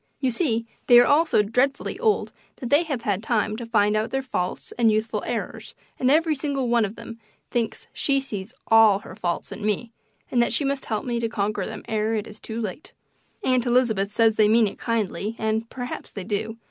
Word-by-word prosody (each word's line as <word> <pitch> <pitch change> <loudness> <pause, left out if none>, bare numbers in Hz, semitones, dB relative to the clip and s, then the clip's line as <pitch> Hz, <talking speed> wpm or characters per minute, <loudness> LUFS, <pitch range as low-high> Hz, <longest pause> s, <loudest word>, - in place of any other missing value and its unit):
You 260 -2 +1
see, 230 -5 0 0.2
they 245 - +8
are 245 - +6
all 315 +3 +4
so 210 - +3
dreadfully 250 +6 0
old 440 -3 +1 0.2
that 245 -3 -7
they 290 +3 +6
have 275 -7 -3
had 205 -3 0
time 215 -2 0
to 235 -1 -6
find 210 -2 +2
out 215 +1 0
their 270 0 -2
faults 180 -8 -3
and 230 -2 +3
youthful 215 +1 -1
errors, - - -4 0.2
and 255 - +2
every 315 +2 +4
single 275 -3 -2
one 235 -2 +3
of 205 +2 -6
them 230 0 -10 0.3
thinks 230 -2 -2
she 275 -1 +2
sees 215 -6 -6 0.2
ALL 225 -3 +7
her - - -11
faults 175 -5 -3
in 210 - -7
me, 215 +2 -1 0.4
and 245 - +3
that 235 - +1
she 275 - +1
must 275 0 -1
help 215 -2 -2
me 240 -2 -1
to 230 -1 -1
conquer 205 -3 -2
them 220 -1 -7
ere 220 0 0
it 215 -1 -2
is 215 -1 -12
too 225 0 -6
late. 215 - -6 0.5
Aunt 255 -1 +2
Elizabeth 225 -5 +2
says 225 0 +3
they 210 -1 +5
mean 225 +1 +5
it 200 - -5
kindly, 215 -2 -2
and 220 +1 -1
perhaps 245 -1 -6
they 200 - -6
do. 220 +3 -3
230 Hz, 215 wpm, -24 LUFS, 215-250 Hz, 0.5 s, they